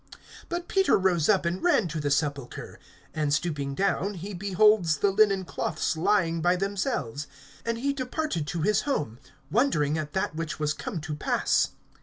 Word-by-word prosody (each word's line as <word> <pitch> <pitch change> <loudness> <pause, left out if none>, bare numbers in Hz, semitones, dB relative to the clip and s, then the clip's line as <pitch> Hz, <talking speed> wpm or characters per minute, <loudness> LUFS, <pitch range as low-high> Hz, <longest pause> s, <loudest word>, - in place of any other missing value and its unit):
(12)But 345 0 -3
Peter 385 -1 +3
rose 185 -4 +2
up, 195 -5 +3
and 175 +2 -1
ran 345 - +3
to 160 0 -3
the 145 -1 -1
sepulchre; 140 -2 -2 0.3
and 150 -2 -1
stooping 145 -3 -1
down, 195 +2 0
he 190 +4 -6
beholds 195 -3 +3
the 200 +6 +2
linen 195 -2 +3
cloths 160 -1 -2
lying 170 -1 +1
by 175 +2 +3
themselves; 190 - -2 0.4
and 230 0 0
he 280 +4 0
departed 255 - -3
to 165 0 -2
his 210 +2 +3
home, 135 - -2 0.3
wondering 160 - +2
at 150 -1 -5
that 190 -1 -1
which 165 -1 -4
was 150 -1 0
come 165 - -5
to 155 0 -5
pass. 150 - +1
175 Hz, 170 wpm, -27 LUFS, 150-210 Hz, 0.4 s, Peter